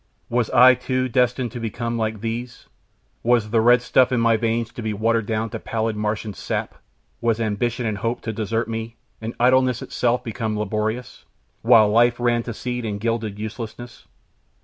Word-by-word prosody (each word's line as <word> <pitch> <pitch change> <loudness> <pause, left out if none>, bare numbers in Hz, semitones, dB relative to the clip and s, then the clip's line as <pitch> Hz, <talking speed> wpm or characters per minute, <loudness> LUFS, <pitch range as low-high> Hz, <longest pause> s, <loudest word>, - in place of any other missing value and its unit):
Was 120 -1 0
I, 130 0 +7
too, 130 0 -1
destined 125 -1 +1
to 120 - -6
become 115 +1 -3
like 110 -2 -2
these? 115 +2 -5 0.6
Was 115 -3 +2
the 115 -1 +3
red 120 +1 +5
stuff 130 0 +3
in 125 - +2
my 115 0 +4
veins 115 +1 -1
to - - -7
be 110 -1 -2
watered 115 0 +1
down 110 0 -2
to - - -4
pallid 110 -1 -2
Martian 105 0 -2
sap? - - -3 0.5
Was 115 -1 +1
ambition 115 +2 -1
and 105 -3 -2
hope 115 +3 -2
to 110 - -4
desert 110 +1 -2
me, 115 0 -5 0.3
and 110 +1 -5
idleness 130 0 +3
itself 120 0 0
become 110 -1 -3
laborious, 110 +3 -3 0.4
while 115 -2 +6
life 120 +3 +3
ran 120 -1 +2
to 115 0 -6
seed 125 0 -4
in 105 -2 -3
gilded 110 -1 -2
uselessness? 110 +2 -7
115 Hz, 175 wpm, -22 LUFS, 110-120 Hz, 0.6 s, I